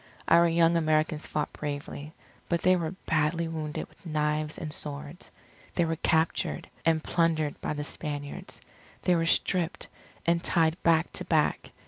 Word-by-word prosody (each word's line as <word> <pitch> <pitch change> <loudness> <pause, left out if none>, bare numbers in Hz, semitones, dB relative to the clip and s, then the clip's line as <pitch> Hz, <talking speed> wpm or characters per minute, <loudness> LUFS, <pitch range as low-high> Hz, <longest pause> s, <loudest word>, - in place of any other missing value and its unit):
Our 170 +1 +6
young 165 0 +4
Americans 155 -1 +1
fought 150 - -2
bravely, 145 0 -5 0.4
but 170 -1 0
they 185 0 +6
were 170 0 -2
badly 165 +1 +1
wounded 155 -2 -4
with - - -25
knives 150 -1 -1
and 155 -2 -5
swords. 145 +3 -7 0.5
They 175 - +3
were 165 0 0
captured, 160 +1 +1 0.2
and 160 -1 +2
plundered 160 -3 +1
by - - -1
the 150 0 -3
Spaniards. 145 -1 -5 0.4
They 180 - +4
were 165 0 +1
stripped, 180 +1 +1 0.4
and 170 +1 +2
tied 165 0 +2
back 165 0 +3
to - - -3
back. - - +1
160 Hz, 150 wpm, -28 LUFS, 150-170 Hz, 0.5 s, Our